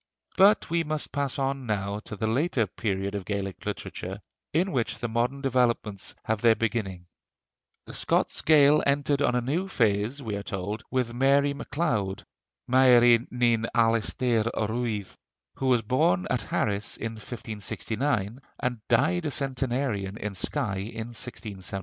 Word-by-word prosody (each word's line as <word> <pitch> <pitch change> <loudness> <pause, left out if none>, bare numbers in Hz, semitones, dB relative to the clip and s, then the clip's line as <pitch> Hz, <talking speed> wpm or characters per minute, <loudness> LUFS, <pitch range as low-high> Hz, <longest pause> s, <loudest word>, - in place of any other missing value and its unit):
But 200 +3 +5
we 170 0 +2
must 155 -1 -3
pass 140 -2 -1
on 135 -2 -2
now 100 -1 -1
to 110 - -6
the 110 - -2
later 125 +1 +1
period 100 0 -3
of 100 -2 -3
Gaelic 100 -1 -4
literature, 95 +2 -5 0.3
in 180 +5 +1
which 125 -5 -1
the 120 - -3
modern 120 +4 -1
developments 120 -6 0
have 110 -1 -1
their 115 -1 +5
beginning. 105 -6 -2 0.8
The - - -10
Scots - - +1
Gael 150 -1 +6
entered 140 0 +1
on 125 - +2
a 125 - +2
new 155 +10 -1
phase, 110 - +1
we 110 -6 -4
are 100 - -3
told, 100 +2 -4
with 125 -3 -1
Mary 140 +3 +3
MacLeod 115 - -2 0.4
(Mairi 120 -2 +6
ni'n 120 -2 +1
Alastair 115 0 +2
Ruaidh), 110 -2 -2 0.4
who 135 - -1
was 125 -3 +3
born 95 -6 +2
at 125 - +1
Harris 105 0 -1
in 115 - -4
1569, 110 +1 -3 0.2
and 125 -3 -2
died 160 +8 +2
a - - -2
centenarian 130 -7 -1
in 105 -3 -4
Skye 100 +2 -2
in 110 +3 -5
1674. 100 -5 -5
120 Hz, 150 wpm, -27 LUFS, 105-135 Hz, 0.8 s, Gael